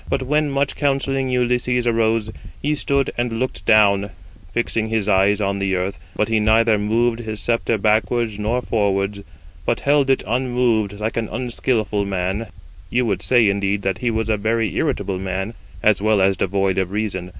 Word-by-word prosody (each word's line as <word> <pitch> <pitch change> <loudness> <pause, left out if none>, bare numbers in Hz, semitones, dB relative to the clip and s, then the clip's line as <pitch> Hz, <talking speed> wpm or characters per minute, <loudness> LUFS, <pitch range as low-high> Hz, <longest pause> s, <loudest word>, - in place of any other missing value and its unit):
But 135 - 0
when 150 +3 +1
much 140 0 0
counselling 135 -2 0
Ulysses 125 0 +1
arose, 115 -2 +1 0.3
he 150 +1 0
stood 140 -2 0
and 120 -1 -1
looked 115 -6 -3
down, 100 -2 +4 0.4
fixing 115 -1 -1
his 110 -2 -1
eyes 100 +1 +3
on 100 -1 -1
the 95 -1 0
earth, 90 +2 -3 0.2
but 105 - 0
he 110 -1 +1
neither 110 0 +3
moved 115 +3 +1
his 110 -2 -5
sceptre 115 +1 0
backwards 110 +1 +1
nor 115 +4 -1
forwards, 100 -2 0 0.4
but 115 +8 -1
held 140 -1 +2
it 135 - +2
unmoved 120 -4 0
like 110 +2 -3
an 115 -2 -2
unskilful 115 -3 -1
man: 95 +3 -2 0.4
you 125 +1 +1
would 100 -5 -1
say 120 -4 +3
indeed 100 0 0
that 95 -1 -1
he 120 - 0
was 110 -1 -1
a 110 -1 +1
very 110 -2 0
irritable 95 -2 -1
man, 95 +3 -3 0.3
as 105 -2 +3
well 110 -1 +3
as 95 0 +3
devoid 95 0 0
of 95 -2 -1
reason. 95 -3 -3
110 Hz, 175 wpm, -20 LUFS, 100-120 Hz, 0.4 s, down